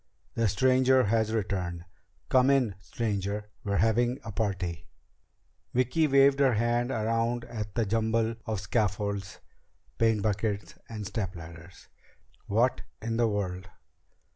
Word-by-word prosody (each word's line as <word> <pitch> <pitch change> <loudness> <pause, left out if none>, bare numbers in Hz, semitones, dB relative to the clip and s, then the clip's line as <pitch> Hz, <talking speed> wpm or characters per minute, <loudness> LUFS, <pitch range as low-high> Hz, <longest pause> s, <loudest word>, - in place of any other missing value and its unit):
"The 115 -1 +1
stranger 130 +4 +4
has 110 0 +1
returned! 90 -5 -2 0.4
Come 130 +1 +4
in, 130 -7 +3
stranger! 105 -1 -3
We're 100 0 -1
having 120 +5 +2
a 115 - -6
party!" 95 -6 -3 0.9
Vicki 130 +6 +2
waved 140 0 +5
her 135 -4 +4
hand 120 +2 +1
around 115 0 0
at 110 -4 -6
the 115 - +1
jumble 110 +2 +1
of 110 -3 -2
scaffolds, 100 -1 -2 0.6
paint 110 -3 +3
buckets, 105 -1 -1 0.2
and 110 -2 -6
stepladders. 90 -4 -7 0.6
"What 120 +5 +2 0.2
in 115 +1 -3
the 120 -1 +3
world 95 -3 -3
110 Hz, 120 wpm, -28 LUFS, 100-120 Hz, 0.9 s, waved